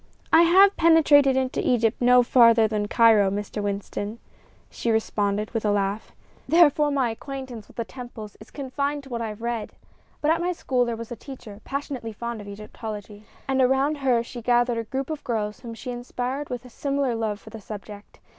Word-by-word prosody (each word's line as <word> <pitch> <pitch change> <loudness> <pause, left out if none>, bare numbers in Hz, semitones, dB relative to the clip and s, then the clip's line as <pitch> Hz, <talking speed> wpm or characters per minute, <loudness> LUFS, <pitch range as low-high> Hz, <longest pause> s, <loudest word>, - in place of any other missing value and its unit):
"I 320 - +8
have 380 +4 +6
penetrated 295 -5 +5
into 260 -1 -1
Egypt 230 -1 +1
no 250 0 +6
farther 230 -2 +5
than 210 -1 -2
Cairo, 220 -3 +5
Mr. 205 +1 -4
Winston," 205 +1 -4 0.5
she 235 - -3
responded, 210 -2 0
with 225 -2 -2
a 210 - +1
laugh; 200 +1 -1 0.4
"therefore 300 -2 +5
my 270 -5 +1
acquaintance 260 -2 -8
with - - -20
the 230 - -2
temples 240 -5 -9
is 215 - -14
confined 280 +1 -3
to 270 - -13
what 235 -2 -3
I 230 - -2
have 215 +1 -8
read. 235 -2 -3 0.5
But 300 - +2
at 330 +1 +1
my 360 +1 0
school 255 -7 0
was 230 -1 -5
a - - -4
teacher 220 -4 -11
passionately 270 -5 -5
fond 235 0 -5
of 205 - -11
Egyptology, 210 0 -8 0.2
and 265 -1 +1
around 270 +4 +2
her 250 -4 +2
she 240 0 -9
gathered 240 0 +2
a 230 - -4
group 270 +5 -4
of 305 -2 -5
girls 215 -3 -2
whom 230 -1 -8
she 250 +2 -6
inspired 250 +3 -4
with 245 0 -5
a - - -11
similar 275 -1 -1
love 220 -2 -2
for 220 - -14
the 225 -1 -9
subject. 205 0 -10
240 Hz, 195 wpm, -24 LUFS, 215-270 Hz, 0.5 s, I